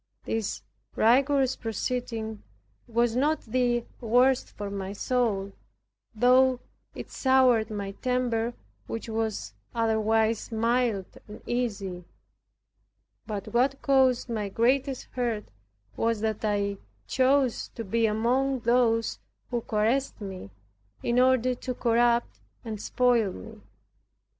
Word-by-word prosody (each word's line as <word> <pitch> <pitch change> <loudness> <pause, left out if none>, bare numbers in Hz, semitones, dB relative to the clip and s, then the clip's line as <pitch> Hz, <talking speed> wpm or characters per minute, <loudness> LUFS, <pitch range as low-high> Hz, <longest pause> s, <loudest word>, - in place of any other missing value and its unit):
This 220 - -2 0.3
rigorous 265 +3 +3
proceeding 225 -1 -3 0.5
was 235 0 +1
not 295 +5 +1
the 240 0 0
worst 250 +2 +3
for 205 -1 -6
my 195 -1 -4
soul, 210 -4 0 0.6
though 255 +2 +4 0.4
it - - -8
soured 260 -4 +3
my 200 -2 -4
temper, 240 0 -1 0.3
which 230 - -5
was 220 - -3 0.2
otherwise 225 0 +1
mild 230 -3 +1 0.2
and 210 +1 -11
easy. 200 -7 -2 1.2
But 210 -1 -5
what 260 +3 +2
caused 260 -3 +3
my 215 -4 -3
greatest 260 +5 +1
hurt 235 -4 -2 0.5
was, 230 -2 0
that 220 -1 -2
I 200 -1 0 0.3
chose 260 -1 +2
to 230 - -4
be 225 +3 +1
among 250 +5 +1
those 230 -1 +2 0.3
who 240 -1 0
caressed 230 +6 0
me, 190 - -7 0.5
in 240 +1 +2
order 255 -1 +4
to 250 0 -5
corrupt 235 0 +2 0.3
and 215 -2 -5
spoil 240 -5 +2
me. 95 - -11
230 Hz, 110 wpm, -27 LUFS, 215-250 Hz, 1.2 s, though